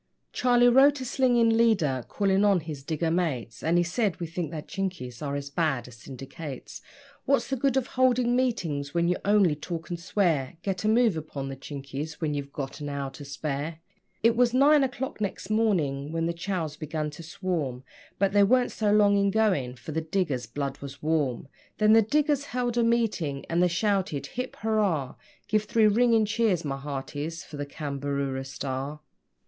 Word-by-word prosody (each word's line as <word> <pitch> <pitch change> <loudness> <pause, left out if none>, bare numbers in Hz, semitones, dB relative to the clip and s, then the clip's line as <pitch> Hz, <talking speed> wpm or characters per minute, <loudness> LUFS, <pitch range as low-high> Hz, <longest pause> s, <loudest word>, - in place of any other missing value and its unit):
Charlie 245 -1 +4
wrote 270 +3 +6
a 260 - -5
slinging 245 -3 +3
leader, 190 - +2
calling 195 -1 +2
on 200 -4 +4
his 155 -3 -7
digger 160 +3 -1
mates, 150 -10 -2
And 165 +2 +2
he 175 - +4
said: 185 +1 -1
'We 170 - -3
think 165 0 -4
that 155 -2 -7
Chinkies 170 -11 -4
are 140 -1 -2
as 140 0 -5
bad 140 -6 0
as 120 -2 -13
syndicates. 135 +3 -8 0.4
What's 275 0 +2
the - - +2
good 270 +1 +1
of 265 - +1
holding 250 -2 +2
meetings 170 - -1
where 170 0 +2
you 180 +1 +1
only 200 -5 +4
talk 165 +3 -6
and 170 - -3
swear? 170 -7 0
Get 190 -1 -2
a - - +1
move 225 -3 +4
upon 145 -3 -5
the 135 - -5
Chinkies 140 +2 -6
when 150 -1 -2
you've 140 -1 -4
got 140 +1 -6
an 145 - -4
hour 140 -1 -3
to 145 - -10
spare.' 145 +2 -4 0.5
It 230 0 +5
was 245 0 +3
nine 285 +2 +6
o'clock 265 -2 -3
next 200 0 -3
morning 155 -11 +1
when 165 0 -1
the 170 - 0
Chows 170 -3 -3
began 155 -1 -3
to 150 - -10
swarm, 165 -8 -3 0.3
But 195 0 +2
they 205 0 +4
weren't 250 +4 +3
so 210 -2 0
long 205 -1 +5
in 200 0 +3
going, 190 - +1
for 145 - -9
the 160 +2 -1
diggers' 155 -8 -1
blood 140 +3 -4
was 140 0 -9
warm. 145 -6 0 0.3
Then 215 0 +5
the 225 - +7
diggers 290 +5 +1
held 245 -3 -2
a 240 - +3
meeting, 215 -12 0
and 170 +1 +2
they 180 - +5
shouted: 185 -5 0
'Hip 250 - -5
hoorar! 200 -11 0 0.3
Give 215 -1 +2
three 225 0 +2
ringing 225 +1 +4
cheers, 205 -6 +1
my 135 -1 -2
hearties, 145 +3 -5
for 150 - -10
the 145 0 -4
CAMBAROORA 140 -2 -3
STAR.' 135 +2 -4
170 Hz, 190 wpm, -27 LUFS, 145-220 Hz, 0.5 s, the